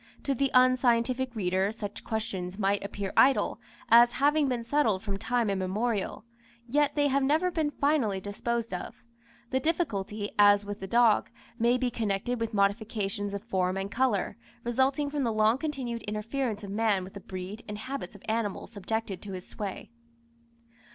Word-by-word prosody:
To 280 - +1
the 275 +1 +1
unscientific 255 0 +3
reader 190 0 +1
such 210 -2 -7
questions 195 -5 -3
might 200 -1 +1
appear 200 -1 -4
idle, 270 0 +4 0.3
as 240 +1 +7
having 290 +1 +3
been 245 -3 -1
settled 230 -7 +1
from 200 -2 -3
time 245 +1 0
immemorial; 200 +3 -1 0.4
yet 290 +3 +2
they 290 -1 +3
have 275 +1 +2
never 310 +7 +2
been 315 -3 0
finally 280 -9 +1
disposed 230 +3 -3
of. 180 - -6 0.5
The 260 - +2
difficulty, 215 - -1
as 205 0 +6
with 205 0 -5
the 190 - -6
dog, 230 0 +4 0.3
may 240 +2 +3
be 250 -1 -1
connected 225 +2 -1
with 230 -1 -2
modifications 205 -1 0
of 200 - -5
form 190 -4 0
and 195 +1 -3
colour, 240 -5 0 0.3
resulting 265 +4 +1
from 290 -2 -1
the 235 - +1
long 215 +3 +3
continued 265 -6 -3
interference 215 +1 -3
of 200 - -6
man 210 -2 +1
with 190 - -10
the 200 - -7
breed 190 +3 -7
and 210 -1 -5
habits 260 0 -6
of 200 - -14
animals 220 -2 -2
subjected 215 -2 -3
to 200 -2 -7
his 185 -1 -7
sway. 205 +1 -6
225 Hz, 165 wpm, -29 LUFS, 200-255 Hz, 0.5 s, as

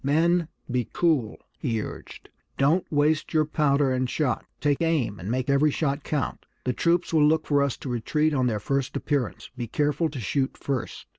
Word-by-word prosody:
"Men, 165 +4 +2 0.2
be 125 -2 -1
cool!" 150 -11 +1 0.2
he 115 -6 -1
urged. - - -8 0.3
"Don't 155 +7 +2
waste 155 +2 +1
your 155 -1 +4
powder 145 -3 +2
and 130 -1 0
shot! 145 -3 -1
Take 145 0 +1
aim, 155 -11 0
and 90 +4 -6
make 130 +2 -1
every 140 +2 +4
shot 140 -1 -1
count! 145 -3 -2 0.2
The 125 - 0
troops 170 +5 +1
will 155 -2 +5
look 160 +1 +2
for 145 -1 +2
us 140 -3 0
to 135 - -7
retreat 150 +6 +1
on 130 -3 +2
their 110 -3 0
first 135 +4 -1
appearance; 140 -7 -2
be 120 -2 -4
careful 150 +6 0
to 140 -3 -6
shoot 130 +5 -1
first." 135 -4 -4
140 Hz, 190 wpm, -26 LUFS, 125-155 Hz, 0.3 s, will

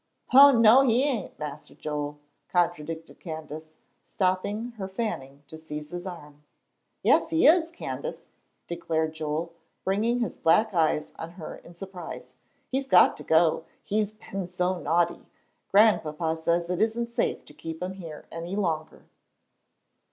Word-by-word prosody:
"Oh, 280 +2 +10
no, 230 +3 +8
he 250 -1 +3
ain', 260 -9 -1
Mas'r 150 -1 -7
Joel," 150 -1 -4 0.3
contradicted 165 -2 -1
Candace, 155 -1 -7 0.3
stopping 205 +4 -1
her 190 - -3
fanning 145 - -4
to 160 +2 -10
seize 150 -1 -7
his 175 +1 -5
arm. 150 -5 -10 0.6
"Yes, - - +4
he 325 - +3
is, 325 +1 +6
Candace," - - -6 0.4
declared 160 -2 -1
Joel, 160 +2 -3 0.3
bringing 215 +5 +1
his 235 - -2
black 210 +6 +3
eyes 155 -3 +1
on 165 +1 -7
her 170 -3 -8
in 170 - -15
surprise; 185 -1 -8 0.3
"he's 270 +1 -2
got 180 -7 +6
to - - -9
go, 160 0 +3 0.2
he's 215 0 -1
been 195 -3 -6
so 180 0 -1
naughty. 170 0 0 0.4
Grandpapa 165 -6 +3
says 170 +2 0
it 180 - -1
isn't 235 +2 0
safe - - -1
to - - -14
keep 160 +1 -7
him 185 +1 -3
here 165 -5 -9
any 170 +3 -5
longer." 165 -6 -2
175 Hz, 145 wpm, -27 LUFS, 160-215 Hz, 0.6 s, Oh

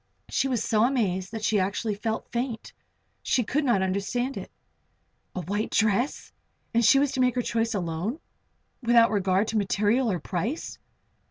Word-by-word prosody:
She 270 - +1
was 245 -4 0
so 215 -1 +2
amazed 200 -8 0
that 220 -1 -6
she 210 -1 +2
actually 200 +3 -1
felt 220 +2 -4
faint 240 -2 -3 0.5
She 250 - +1
could 290 +8 0
not 235 -8 +2
understand 200 +8 -1
it. - - -7 0.9
A 185 - -2
white 205 +6 -2
dress! 220 +5 0 0.4
And 235 +1 +3
she 225 +5 +6
to 265 -2 -4
make 250 -1 +2
her 245 - 0
choice 230 -1 -1
alone, 180 - -3 0.6
without 235 -2 +5
regard 195 0 +1
to 225 - -1
material, 210 +5 +1
or 180 - 0
price! 200 - -4
220 Hz, 160 wpm, -26 LUFS, 200-245 Hz, 0.9 s, she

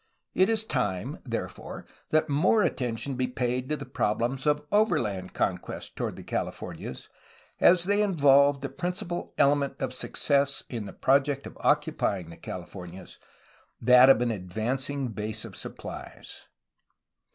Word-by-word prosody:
It 185 +3 +4
is 220 -1 +1
time, 125 - -2
therefore, 115 -3 -5 0.2
that 155 0 +3
more 170 +9 +3
attention 125 +1 -2
be 130 0 0
paid 125 0 -2
to 150 - +1
the 140 - -7
problems 125 +3 -1
of 150 0 +2
overland 120 - +1
conquest - - -3
toward - - -3
the - - -10
Californias, - - -5 0.5
as 175 -1 +6
they 205 +3 +2
involved 140 -7 +4
the 135 - -2
principal 175 -1 -4
ele 140 +1 +5
ment 140 -1 -2
of - - -2
success 140 -1 +1
in 115 -4 -4
the - - -7
project 140 +1 +2
of - - -9
occupying 90 -4 +1
the 85 - -11
Californias, 90 0 -9 0.6
that 125 +2 +7
of 120 -3 +6
an 120 -1 +1
advancing 125 +8 -2
base 110 0 -3
of - - -10
supplies. - - -8
135 Hz, 140 wpm, -27 LUFS, 115-150 Hz, 0.6 s, that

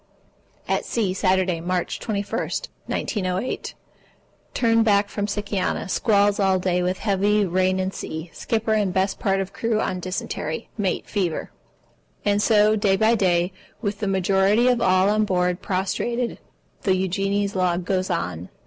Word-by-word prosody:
At - - 0
sea, 210 -6 -1
Saturday, 185 -2 +1
March 180 +1 -2
21, 205 -3 -2 0.5
1908. 185 +2 -2 0.8
Turned 230 -1 +3
back 205 -2 +3
from 205 -1 -2
Sikiana. 205 -1 -2
Squalls 205 -2 +3
all 190 -1 +3
day 180 -1 0
with 180 +1 0
heavy 205 0 +2
rain 185 +1 +1
and 190 +1 -1
sea. 160 +2 -6
Skipper 220 -1 -1
and 205 -3 +1
best 190 +2 0
part 195 -1 +1
of 195 0 -4
crew 230 -2 0
on 185 -4 -1
dysentery. 175 -3 -4
Mate 200 -4 -1
fever. 180 -6 -2 0.7
And 205 0 +2
so, 215 -1 +4
day 205 -2 +2
by 220 +3 +3
day, 180 -4 +2 0.3
with 205 -1 -2
the 210 - -2
majority 195 +4 +3
of 245 -2 +2
all 185 -1 +4
on 215 +1 +3
board 180 -3 0
prostrated, 235 +6 -2 0.4
the 190 - +2
Eugenie's 195 +2 0
log 180 -1 0
goes 185 0 0
on. 90 +1 -3
195 Hz, 150 wpm, -23 LUFS, 185-210 Hz, 0.8 s, so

